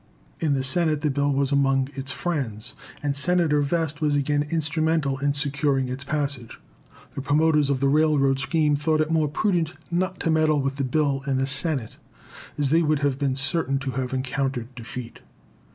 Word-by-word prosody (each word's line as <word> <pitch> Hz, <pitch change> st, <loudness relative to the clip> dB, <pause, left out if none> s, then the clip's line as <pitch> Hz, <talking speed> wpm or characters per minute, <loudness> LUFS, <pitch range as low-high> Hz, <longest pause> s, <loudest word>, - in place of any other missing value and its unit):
In 150 Hz, -3 st, +1 dB
the 135 Hz, -, -1 dB
Senate 155 Hz, +2 st, +1 dB
the 150 Hz, -, +1 dB
bill 140 Hz, +1 st, +1 dB
was 140 Hz, 0 st, 0 dB
among 135 Hz, -1 st, +2 dB
its 135 Hz, +1 st, -5 dB
friends, 130 Hz, -13 st, -3 dB, 0.3 s
and 145 Hz, -1 st, 0 dB
Senator 155 Hz, 0 st, +2 dB
Vest 155 Hz, 0 st, -1 dB
was 150 Hz, -1 st, +2 dB
again 145 Hz, +1 st, +1 dB
instrumental 155 Hz, -3 st, 0 dB
in 140 Hz, +1 st, 0 dB
securing 140 Hz, -2 st, 0 dB
its 130 Hz, +2 st, -5 dB
passage. 140 Hz, -5 st, -3 dB, 0.5 s
The -, -, -4 dB
promoters 150 Hz, 0 st, +2 dB
of 135 Hz, -2 st, 0 dB
the 140 Hz, -, +3 dB
railroad 140 Hz, -2 st, +3 dB
scheme 150 Hz, 0 st, +2 dB
thought 155 Hz, +2 st, +1 dB
it 155 Hz, +1 st, -1 dB
more 160 Hz, -2 st, +2 dB
prudent 170 Hz, +1 st, 0 dB, 0.2 s
not 185 Hz, +1 st, -1 dB
to 165 Hz, -, +1 dB
meddle 155 Hz, -1 st, +3 dB
with 135 Hz, 0 st, -2 dB
the 140 Hz, -, -1 dB
bill 140 Hz, +1 st, +1 dB
in 135 Hz, -1 st, +1 dB
the 135 Hz, -, +1 dB
Senate, 140 Hz, -3 st, -2 dB, 0.6 s
as 145 Hz, -2 st, +1 dB
they 165 Hz, +2 st, +5 dB
would 155 Hz, -2 st, +1 dB
have 140 Hz, -1 st, 0 dB
been 140 Hz, -2 st, 0 dB
certain 140 Hz, 0 st, 0 dB
to 135 Hz, -1 st, -3 dB
have 130 Hz, 0 st, -3 dB
encountered 130 Hz, -1 st, -2 dB
defeat. 120 Hz, 0 st, -8 dB
145 Hz, 185 wpm, -24 LUFS, 135-155 Hz, 0.6 s, they